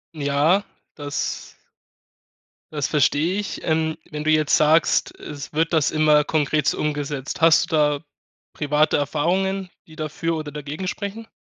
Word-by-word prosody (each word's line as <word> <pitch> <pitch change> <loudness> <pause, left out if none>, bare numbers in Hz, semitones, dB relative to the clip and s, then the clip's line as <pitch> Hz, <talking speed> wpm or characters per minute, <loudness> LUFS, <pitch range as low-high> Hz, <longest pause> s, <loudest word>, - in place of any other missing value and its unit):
Ja, 150 +6 +2 0.3
das 145 -1 -4 1.2
das 145 -2 -1
verstehe 150 +4 +2
ich. 205 - -5
Ähm, 160 0 0
wenn 150 -1 -5
du 155 - +2
jetzt 155 -2 +3
sagst: 155 +1 +3
„Es 145 -2 -8
wird 165 +2 0
das 155 -3 +2
immer 155 -1 +4
konkret 150 0 +1
umgesetzt?" 145 -2 -3
Hast 165 -1 +5
du - - +2
da 150 -1 +2 0.5
private 150 +1 +1
Erfahrungen, 180 +6 -1 0.2
die 160 - -15
dafür 155 +2 -3
oder 155 -2 -6
dagegen 150 +5 -6
sprechen? 205 +3 -5
155 Hz, 135 wpm, -22 LUFS, 145-165 Hz, 1.2 s, Hast